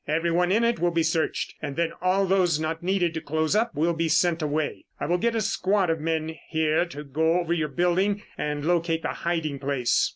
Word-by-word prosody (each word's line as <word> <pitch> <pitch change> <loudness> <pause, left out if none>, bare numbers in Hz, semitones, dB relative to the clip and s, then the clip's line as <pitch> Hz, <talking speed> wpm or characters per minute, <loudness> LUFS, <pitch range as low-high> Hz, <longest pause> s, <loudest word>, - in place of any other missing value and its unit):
Everyone 170 +3 +1
in 225 +4 +3
it 235 -4 +1
will 175 +1 +2
be 165 -1 +1
searched 160 0 -1
and 145 -2 -4
then 170 0 0
all 185 +2 +2
those 180 -4 +2
not 160 +1 -3
needed 180 -2 +1
to 160 - -4
close 155 +4 0
up 220 -5 +1
will 165 +4 +1
be 165 0 -1
sent 170 +1 +2
away. 150 0 -2
I - - -2
will 175 +1 +1
get 235 +2 +1
a 225 - +1
squad 195 -3 +1
of 165 - -1
men 160 0 -2
here 160 +1 +2
to 150 -3 -8
go 160 +5 +1
over 170 -1 -1
your 160 -3 0
building 180 +7 +1
and 150 0 -3
locate 165 -1 +1
the - - -1
hiding 165 -5 -2
place. 135 -3 +1
165 Hz, 220 wpm, -25 LUFS, 155-180 Hz, -, in